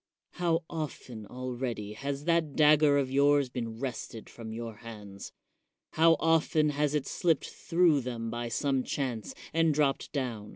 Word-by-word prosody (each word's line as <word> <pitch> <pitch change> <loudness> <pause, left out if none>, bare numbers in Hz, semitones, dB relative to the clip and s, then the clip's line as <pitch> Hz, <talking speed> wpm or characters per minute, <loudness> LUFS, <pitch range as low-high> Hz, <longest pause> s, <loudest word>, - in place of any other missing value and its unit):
How 170 -1 0
often 130 -9 -6
already 125 -4 -4
has 140 +4 -4
that 165 -4 +1
dagger 150 -1 +5
of 135 -2 0
yours 140 0 +4
been 115 -2 -5
wrested 120 -3 -6
from 115 -2 -8
your 115 -1 -6
hands? 105 -4 -9 0.6
How 165 +1 +5
often 160 -1 +3
has 150 0 0
it 145 - 0
slipped 165 -4 0
through 165 -4 +2
them 115 -2 -4
by 120 0 -3
some 135 +3 0
chance, 125 -7 -3 0.2
and 165 -2 +3
dropped 140 -2 +1
down? 120 -7 -3
135 Hz, 150 wpm, -30 LUFS, 115-150 Hz, 0.6 s, dagger